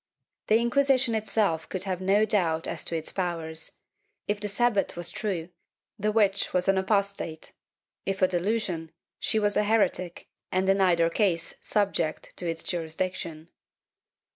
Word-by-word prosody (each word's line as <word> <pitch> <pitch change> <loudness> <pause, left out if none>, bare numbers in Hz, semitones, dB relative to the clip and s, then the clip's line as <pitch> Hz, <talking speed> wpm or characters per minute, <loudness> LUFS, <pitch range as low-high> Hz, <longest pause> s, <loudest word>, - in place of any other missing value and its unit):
^ - - -61
The 215 - +5
Inquisi 265 +3 +3
tion 245 -3 0
itself 210 -6 0
could 185 -1 -3
have 185 -2 -3
no 200 +3 +4
doubt 170 -6 +1
as - - -4
to 165 - -1
its 160 - -3
powers; 165 -3 -3 0.5
if 205 0 0
the 210 - -1
Sabbat 210 -1 +1
was 175 0 -4
true, 185 -6 -3 0.5
the 210 +1 +1
witch 205 -2 +2
was 180 0 +2
an 195 0 +4
apostate; 200 -5 -1 0.5
if 195 0 -1
a - - +7
delusion, 180 -3 -1 0.3
she - - +1
was 205 -1 +2
a - - +3
heretic 205 -5 0 0.2
and 185 +1 +1
in 195 0 +3
either 170 -3 +4
case 170 -5 +1
subject 195 -6 -1
to 175 - -2
its 165 -1 -3
jurisdiction. 165 -1 -4
190 Hz, 160 wpm, -27 LUFS, 170-210 Hz, 0.5 s, a